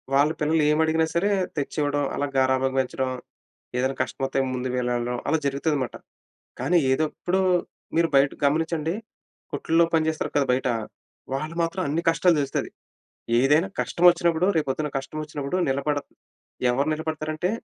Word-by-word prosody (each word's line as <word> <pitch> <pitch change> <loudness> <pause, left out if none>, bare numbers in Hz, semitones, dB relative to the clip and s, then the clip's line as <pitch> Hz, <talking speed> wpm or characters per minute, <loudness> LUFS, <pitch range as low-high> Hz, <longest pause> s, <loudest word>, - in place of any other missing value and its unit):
వాళ్ళ 145 +2 +5
పిల్లలు 155 +1 +2
ఏమి 150 +1 +3
అడిగినా 160 0 +2
సరే 200 +5 +2 0.3
తెచ్చి 145 +1 -3
ఇవ్వడం. 145 0 0
అలా 145 - -1
గారాబంగా 130 0 +2
పెంచడం. 130 0 -2 0.7
ఏదైనా 130 +1 0
కష్టం 130 - -6
వత్తే 135 - -1
ముందు 125 0 -2
వెళ్ళడం 125 0 -1
అలా 160 +2 +3
జరుగుతది 140 +2 0
మాట. 120 - -9 0.7
కానీ 180 - +3
ఏదో 155 +4 +2
ఎప్పుడు 185 +2 0 0.6
మీరు 165 0 +3
బయట 135 0 +5 0.2
గమనించండి, 160 +2 0 0.6
కొట్లో 165 +1 +2
పని 160 -1 +3
చేస్తారు 155 - -4
కదా! 140 -2 +3
బయట, 130 +1 0 0.7
వాళ్ళు 155 +4 -3
మాత్రం 170 +3 -1
అన్ని 160 +4 0
కష్టాలు 165 +1 +3
తెలుస్తది. 140 -1 -2 0.7
ఏదైనా 150 +7 +4
కష్టం 175 - -3
వచ్చినప్పుడు, 170 0 +1
రేపు 155 - 0
పొద్దున 150 +3 -1
కష్టం 135 +3 -6
వచ్చినప్పుడు, 150 +2 -3
నిలబడ 140 +2 0 0.7
ఎవరు 135 +4 0
నిలబడతారంటే, 155 +2 -2
150 Hz, 150 wpm, -25 LUFS, 135-160 Hz, 0.7 s, వాళ్ళ